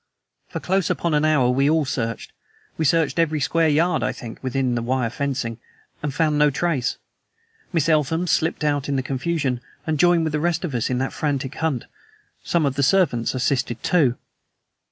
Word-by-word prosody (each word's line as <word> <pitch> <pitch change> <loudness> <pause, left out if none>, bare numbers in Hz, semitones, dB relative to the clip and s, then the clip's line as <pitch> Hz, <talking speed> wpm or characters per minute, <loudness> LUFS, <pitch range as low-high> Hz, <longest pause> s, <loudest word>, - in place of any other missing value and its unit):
For - - -4
close 190 0 0
upon 170 -2 0
an 150 0 +2
hour 140 -5 +3
we 135 +3 +2
all 155 -1 +2
searched. 115 -4 -3 0.4
We 160 - -1
searched 165 +2 +2
every 155 -2 +2
square 165 +3 +2
yard, 165 +4 +2
I - - 0
think, 115 -2 -9
within 130 -1 -1
the 120 - -1
wire 120 -1 -1
fencing, 130 -4 -3 0.4
and 150 - -2
found 150 0 +1
no 150 0 +5
trace. 145 -3 -1 0.7
Miss 165 -5 +1
Eltham 160 +2 +2
slipped 160 -2 0
out 145 -2 0
in 140 - 0
the 130 - 0
confusion, 135 -1 -1 0.2
and 155 -2 -1
joined 175 0 +4
with 160 -1 -2
the 150 - +1
rest 170 +2 0
of 155 - -5
us 120 -3 -1
in 125 - 0
that 130 +1 -2
frantic 140 -3 -2
hunt. 160 -7 -2 0.6
Some 170 -3 +1
of 140 - +1
the 140 - -1
servants 140 -7 +2
assisted 125 -2 -1
too. 145 -9 +2
145 Hz, 190 wpm, -22 LUFS, 130-160 Hz, 0.7 s, no